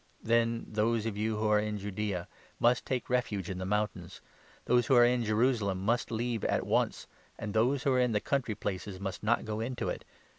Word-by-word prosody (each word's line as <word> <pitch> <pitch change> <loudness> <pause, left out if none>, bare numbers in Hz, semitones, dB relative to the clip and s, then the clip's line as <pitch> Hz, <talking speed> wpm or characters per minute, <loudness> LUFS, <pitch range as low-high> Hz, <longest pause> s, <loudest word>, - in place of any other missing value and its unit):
Then 115 0 +1
those 110 +1 0
of 110 -3 -2
you 110 +1 -1
who 110 0 0
are 105 0 +4
in 105 0 -2
Judaea 100 -2 -3 0.3
must 120 +1 +3
take 130 -2 -1
21 125 - +1
refuge 100 -7 -4
in 90 - -5
the 95 - -3
mountains, 105 -4 -2 0.5
those 120 -2 +3
who 135 - +4
are 120 0 +8
in 120 0 +2
Jerusalem 110 -3 +1
must 115 +5 0
leave 115 0 -2
at - - +1
once, - - 0 0.3
and 105 -3 -5
those 125 +5 +2
who 135 - +2
are 130 - +3
in 125 -1 +2
the 105 - +2
country 125 -3 -1
places 95 -1 -4
must 95 -2 -4
not 115 +3 +1
go 110 0 -3
into 120 +2 -2
it. - - -4
110 Hz, 215 wpm, -31 LUFS, 105-120 Hz, 0.5 s, are